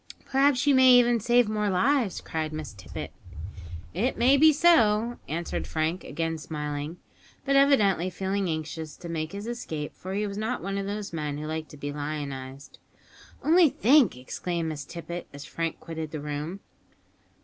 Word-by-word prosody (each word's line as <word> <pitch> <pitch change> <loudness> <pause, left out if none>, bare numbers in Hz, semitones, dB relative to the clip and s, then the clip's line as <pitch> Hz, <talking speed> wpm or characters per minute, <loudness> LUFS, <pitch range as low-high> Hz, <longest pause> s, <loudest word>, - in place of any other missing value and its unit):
"Perhaps 270 -1 +3
you 285 - +5
may 260 -1 +7
even 240 -1 +5
save 240 +1 +3
more 210 -1 0
lives!" 230 +2 +1
cried 155 -1 -3
Miss 155 -4 -6
Tippet. 90 -4 -8 0.8
"It 230 +9 0
may 255 +4 +5
be 310 +3 +7
so," 240 -8 +4
answered 165 +3 -3
Frank, 160 +3 -1
again 165 +1 -3
smiling, 150 +1 -4 0.5
but 275 0 +2
evidently 210 - +4
feeling 190 0 -2
anxious 155 0 -4
to 175 - -9
make 160 -1 -3
his 200 +1 -6
escape, 160 -11 -5
for 190 +1 -6
he 210 +1 0
was 200 0 -4
not 225 +4 -2
one 195 0 -2
of 195 - -3
those 205 -2 -4
men 150 -3 -3
who 150 - -5
like 160 0 -4
to 150 - -13
be 145 0 -5
lionised. 140 -2 -6 0.6
"Only 330 0 +6
think!" 255 - +4
exclaimed 165 +6 -3
Miss 150 -2 -5
Tippet 170 +1 -7
as 145 0 -9
Frank 165 -1 -3
quitted 160 -1 -6
the 155 - -5
room. 150 +6 -5
175 Hz, 170 wpm, -27 LUFS, 155-235 Hz, 0.8 s, may